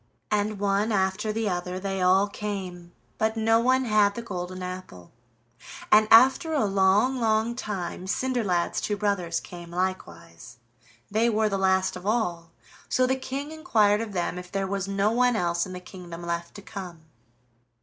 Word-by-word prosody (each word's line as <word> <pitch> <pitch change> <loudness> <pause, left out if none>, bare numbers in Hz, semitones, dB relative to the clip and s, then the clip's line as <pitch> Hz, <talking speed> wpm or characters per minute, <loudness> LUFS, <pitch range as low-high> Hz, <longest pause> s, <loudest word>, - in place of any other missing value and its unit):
And 210 0 0
one 200 +2 +1
after 195 +1 0
the 220 0 -1
other 180 0 -3
they 195 0 -3
all 190 +2 +4
came, 190 -4 -6 0.3
but 220 +1 0
no 225 +1 +3
one 260 +2 +2
had 210 -2 +3
the 235 - -5
golden 185 -3 -5
apple, 180 - -8 0.8
and 215 0 +6
after 265 +8 +6
a 280 -7 +2
long, 200 +6 +3
long 220 0 +1
time 190 -6 -5
Cinderlad's 200 -5 0
two 205 - -2
brothers 195 -5 -1
came 175 -1 -10
likewise. 170 -8 -5 0.5
They 225 +3 +2
were 215 -1 +1
the 195 -1 -1
last 190 0 +2
of 180 +2 -7
all, 175 -7 -1 0.4
so 255 - +3
the 260 +1 +1
King 270 +3 -5
inquired 215 -9 +2
of 220 -3 -5
them 175 0 -2
if 180 0 -11
there 195 -1 -1
was 195 0 -3
no 200 +2 +1
one 245 +1 +3
else 170 -3 0
in 185 - -8
the 180 - -6
kingdom 180 -2 -10
left 170 0 -4
to 205 - -10
come. 180 -3 -8
200 Hz, 170 wpm, -26 LUFS, 180-220 Hz, 0.8 s, and